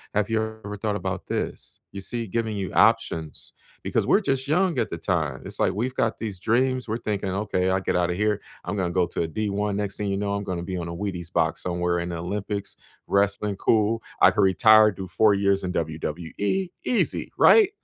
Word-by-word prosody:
"Have 105 Hz, 0 st, +1 dB
you 110 Hz, -, +2 dB, 0.2 s
ever 105 Hz, 0 st, -5 dB
thought 105 Hz, -2 st, 0 dB
about 95 Hz, -1 st, -4 dB
this?" -, -, -4 dB
You 100 Hz, -, -7 dB
see, 115 Hz, +4 st, -3 dB
giving 110 Hz, +1 st, -2 dB
you 95 Hz, -2 st, -3 dB
options 80 Hz, -2 st, +1 dB, 0.3 s
because -, -, 0 dB
we're 205 Hz, -, +4 dB
just 135 Hz, -7 st, -1 dB
young 170 Hz, -1 st, +2 dB
at 115 Hz, -, 0 dB
the 85 Hz, -, -4 dB
time, 80 Hz, -, -1 dB
it's -, -, -8 dB
like -, -, +2 dB
we've 125 Hz, +5 st, -2 dB
got 115 Hz, -3 st, 0 dB
these 105 Hz, -5 st, -5 dB
dreams. 125 Hz, +4 st, +1 dB
We're 110 Hz, -, -1 dB
thinking, 105 Hz, -4 st, -2 dB
"Okay, 95 Hz, -1 st, 0 dB
I'll 95 Hz, 0 st, +1 dB
get -, -, -1 dB
out 90 Hz, -1 st, +2 dB
of 90 Hz, -, -1 dB
here. 105 Hz, -1 st, +1 dB, 0.2 s
I'm -, -, -3 dB
gonna 90 Hz, -3 st, 0 dB
go 90 Hz, 0 st, +2 dB
to -, -, -3 dB
a -, -, -2 dB
D-1. 105 Hz, +3 st, -2 dB
Next 100 Hz, -1 st, -3 dB
thing 105 Hz, -, -2 dB
you 95 Hz, -, -1 dB
know, 100 Hz, 0 st, -1 dB
I'm 100 Hz, 0 st, -2 dB
gonna 90 Hz, -3 st, -4 dB
be 95 Hz, 0 st, -4 dB
on 85 Hz, -1 st, -4 dB
a 85 Hz, -, -5 dB
Wheaties 90 Hz, -3 st, -5 dB
box -, -, 0 dB
somewhere 90 Hz, -1 st, -1 dB
in 85 Hz, -, -3 dB
the 85 Hz, -, -4 dB
Olympics, 100 Hz, +3 st, -4 dB, 0.3 s
wrestling, 100 Hz, 0 st, +1 dB
cool. 110 Hz, +2 st, +2 dB, 0.2 s
I -, -, +8 dB
could -, -, +1 dB
retire, 105 Hz, +4 st, +6 dB
do 95 Hz, -1 st, -7 dB
4 110 Hz, +2 st, +3 dB
years 100 Hz, 0 st, +1 dB
in 90 Hz, -, -2 dB
WWE. 85 Hz, -, -2 dB
Easy," 245 Hz, -, +1 dB
right? 430 Hz, -4 st, +7 dB
100 Hz, 220 wpm, -25 LUFS, 90-110 Hz, 0.3 s, I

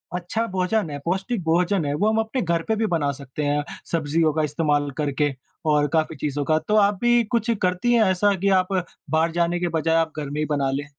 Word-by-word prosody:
अच्छा 180 Hz, +6 st, -2 dB
भोजन 185 Hz, 0 st, 0 dB
है, 145 Hz, -1 st, -5 dB
पौष्टिक 190 Hz, +4 st, -1 dB
भोजन 170 Hz, +1 st, +1 dB
है 145 Hz, -, -1 dB
वो 210 Hz, +6 st, +2 dB
हम 220 Hz, -, +1 dB
अपने 225 Hz, +4 st, -1 dB
घर 170 Hz, -1 st, 0 dB
पे 220 Hz, -, +1 dB
भी 220 Hz, +1 st, 0 dB
बना 150 Hz, -6 st, 0 dB
सकते 140 Hz, +1 st, -6 dB
हैं, 145 Hz, +1 st, +1 dB, 0.3 s
सब्ज़ियों 160 Hz, -1 st, +1 dB
का 155 Hz, -, 0 dB
इस्तेमाल 150 Hz, -1 st, 0 dB
करके 145 Hz, -1 st, 0 dB, 0.4 s
और 145 Hz, 0 st, +3 dB
काफ़ी 160 Hz, 0 st, +1 dB
चीज़ों 145 Hz, 0 st, -2 dB
का। 155 Hz, 0 st, +2 dB
तो 210 Hz, -, +2 dB
आप 200 Hz, -2 st, +3 dB
भी 240 Hz, 0 st, +4 dB
कुछ 230 Hz, +1 st, +1 dB
करती 185 Hz, +6 st, +1 dB
हैं 235 Hz, -, +4 dB
ऐसा 200 Hz, +2 st, +2 dB
कि 195 Hz, +2 st, 0 dB
आप 185 Hz, +2 st, -6 dB, 0.4 s
बाहर 160 Hz, +2 st, +2 dB
जाने 175 Hz, +1 st, 0 dB
के 175 Hz, -, 0 dB
बजाय 165 Hz, +1 st, +1 dB
आप 165 Hz, -1 st, +1 dB
घर 145 Hz, -, -4 dB
में 145 Hz, +2 st, -4 dB
ही 155 Hz, -, +1 dB
बना 140 Hz, -3 st, 0 dB
लें? 140 Hz, +2 st, -3 dB
165 Hz, 230 wpm, -23 LUFS, 150-195 Hz, 0.4 s, भी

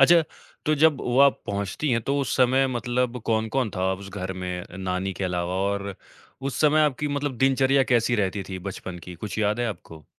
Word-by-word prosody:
अच्छा, 165 Hz, +4 st, +7 dB, 0.4 s
तो 155 Hz, -, +4 dB
जब 150 Hz, -2 st, +4 dB
वो 125 Hz, +1 st, 0 dB
आप 140 Hz, -1 st, +5 dB
पहुँचती 100 Hz, +8 st, -2 dB
हैं, 115 Hz, -, +2 dB
तो 140 Hz, +5 st, 0 dB
उस 135 Hz, -, -1 dB
समय 130 Hz, +1 st, +4 dB
मतलब 125 Hz, 0 st, -1 dB
कौन-कौन 110 Hz, +2 st, 0 dB
था 95 Hz, +1 st, +1 dB
उस 100 Hz, +1 st, -9 dB
घर 95 Hz, -1 st, -4 dB
में 90 Hz, -1 st, -4 dB
अ, 90 Hz, -, -11 dB
नानी 95 Hz, 0 st, -2 dB
के 95 Hz, -, -4 dB
अलावा? 90 Hz, 0 st, -1 dB
और 100 Hz, +1 st, -1 dB, 0.5 s
उस 135 Hz, -1 st, -3 dB
समय 155 Hz, 0 st, +5 dB
आपकी 150 Hz, -1 st, +1 dB
मतलब 145 Hz, -2 st, -2 dB
दिनचर्या 135 Hz, +1 st, +4 dB
कैसी 120 Hz, -2 st, +2 dB
रहती 100 Hz, -1 st, 0 dB
थी, 95 Hz, -1 st, -5 dB
बचपन 95 Hz, -1 st, -6 dB
की, 90 Hz, +1 st, -9 dB
कुछ 105 Hz, +5 st, -6 dB
याद 105 Hz, +2 st, +1 dB
है 120 Hz, -, +1 dB
आपको? 80 Hz, -7 st, -9 dB
110 Hz, 205 wpm, -25 LUFS, 95-135 Hz, 0.5 s, अच्छा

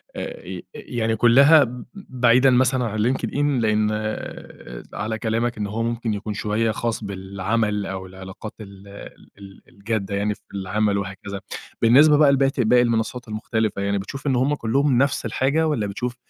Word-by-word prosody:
آآ، -, -, -6 dB, 0.3 s
يعني 115 Hz, -2 st, -2 dB
كلها 140 Hz, +7 st, +6 dB
ب 125 Hz, -1 st, -7 dB
بعيدًا 130 Hz, -, +3 dB
مثلًا 130 Hz, 0 st, +2 dB
عن 110 Hz, -1 st, -3 dB
LinkedIn، 140 Hz, -1 st, -1 dB
لأن 105 Hz, -1 st, +2 dB, 1.0 s
على 110 Hz, +2 st, -3 dB
كلامك 115 Hz, +2 st, -1 dB
إن 105 Hz, -1 st, -2 dB
هو 110 Hz, +3 st, -3 dB
ممكن 115 Hz, -1 st, -2 dB
يكون 105 Hz, +1 st, -4 dB
شوية 110 Hz, +2 st, 0 dB
خاص 115 Hz, 0 st, -3 dB
بالعمل، 100 Hz, +2 st, -2 dB
أو 95 Hz, 0 st, -5 dB
العلاقات 95 Hz, +3 st, -9 dB
ال 100 Hz, -1 st, -12 dB, 0.5 s
ال 100 Hz, -1 st, -13 dB
الجادة 100 Hz, -1 st, -3 dB
يعني 105 Hz, +1 st, 0 dB
في -, -, -28 dB
العمل 100 Hz, +1 st, 0 dB
وهكذا. 100 Hz, 0 st, -6 dB, 0.4 s
بالنسبة 145 Hz, +6 st, +6 dB
بقى 145 Hz, -2 st, +6 dB
لبت 135 Hz, 0 st, +1 dB
لباقي 120 Hz, +1 st, +4 dB
المنصات 115 Hz, +1 st, -1 dB
المختلفة، 110 Hz, -1 st, -2 dB
يعني 100 Hz, 0 st, 0 dB
بتشوف 135 Hz, +9 st, -6 dB
إن 135 Hz, -, +2 dB
هُم 135 Hz, +4 st, +1 dB
كلّهم 135 Hz, +2 st, +1 dB
نفس 140 Hz, +2 st, +1 dB
الحاجة، 150 Hz, +5 st, +1 dB
والّا 120 Hz, -9 st, -1 dB
بتشوف 120 Hz, +5 st, -4 dB
115 Hz, 155 wpm, -22 LUFS, 100-125 Hz, 1.0 s, كلها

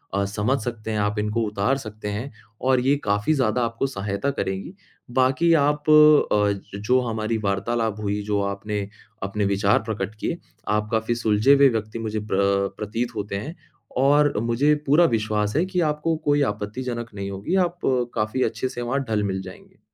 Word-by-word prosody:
अ, 100 Hz, 0 st, +1 dB
समझ 105 Hz, +7 st, 0 dB
सकते 110 Hz, -2 st, -5 dB
हैं, 105 Hz, -, -1 dB
आप 105 Hz, +1 st, 0 dB
इनको 105 Hz, +2 st, -1 dB
उतार 105 Hz, +6 st, 0 dB
सकते 110 Hz, -5 st, -8 dB
हैं, 110 Hz, +7 st, -4 dB, 0.3 s
और 130 Hz, 0 st, +3 dB
ये 135 Hz, +3 st, +3 dB
काफ़ी 105 Hz, +8 st, +1 dB
ज़्यादा 125 Hz, -3 st, +1 dB
आपको 115 Hz, +4 st, -2 dB
सहायता 100 Hz, +1 st, -2 dB
करेगी। 95 Hz, -, -4 dB, 0.4 s
बाकी 130 Hz, +7 st, +3 dB
आप 150 Hz, -1 st, +2 dB, 0.4 s
अ, 100 Hz, -1 st, 0 dB
जो 125 Hz, +5 st, +2 dB
हमारी 115 Hz, -1 st, -2 dB
वार्तालाप 110 Hz, +2 st, -1 dB
हुई, 105 Hz, 0 st, -1 dB
जो 105 Hz, -1 st, 0 dB
आपने 100 Hz, +1 st, -3 dB, 0.4 s
अपने 100 Hz, +1 st, -1 dB
विचार 100 Hz, +1 st, +2 dB
प्रकट 105 Hz, -2 st, -4 dB
किए, 170 Hz, -, -2 dB, 0.3 s
आप 105 Hz, 0 st, 0 dB
काफ़ी 110 Hz, +1 st, 0 dB
सुलझे 110 Hz, +3 st, +3 dB
हुए 140 Hz, -1 st, +6 dB
व्यक्ति 110 Hz, 0 st, -3 dB
मुझे 110 Hz, -1 st, -3 dB
प्र 100 Hz, -1 st, +1 dB
प्रतीत 115 Hz, +3 st, -3 dB
होते 100 Hz, -1 st, -4 dB
हैं, 150 Hz, -, -5 dB, 0.4 s
और 145 Hz, +2 st, +4 dB
मुझे 120 Hz, +7 st, +2 dB
पूरा 160 Hz, +5 st, +5 dB
विश्वास 110 Hz, -2 st, 0 dB
है 165 Hz, -, +3 dB
कि 185 Hz, -2 st, -1 dB
आपको 150 Hz, +2 st, 0 dB
कोई 145 Hz, 0 st, +3 dB
आपत्तिजनक 115 Hz, +3 st, -4 dB
नहीं 100 Hz, -1 st, -4 dB
होगी। 100 Hz, -, -2 dB
आप 175 Hz, +1 st, -14 dB, 0.4 s
काफ़ी 110 Hz, +4 st, 0 dB
अच्छे 115 Hz, +3 st, -1 dB
से 120 Hz, -2 st, -6 dB
वहाँ 135 Hz, +4 st, -1 dB
ढल-मिल 100 Hz, -3 st, -1 dB
जाएँगे। -, -, -13 dB
110 Hz, 170 wpm, -23 LUFS, 105-130 Hz, 0.4 s, हुए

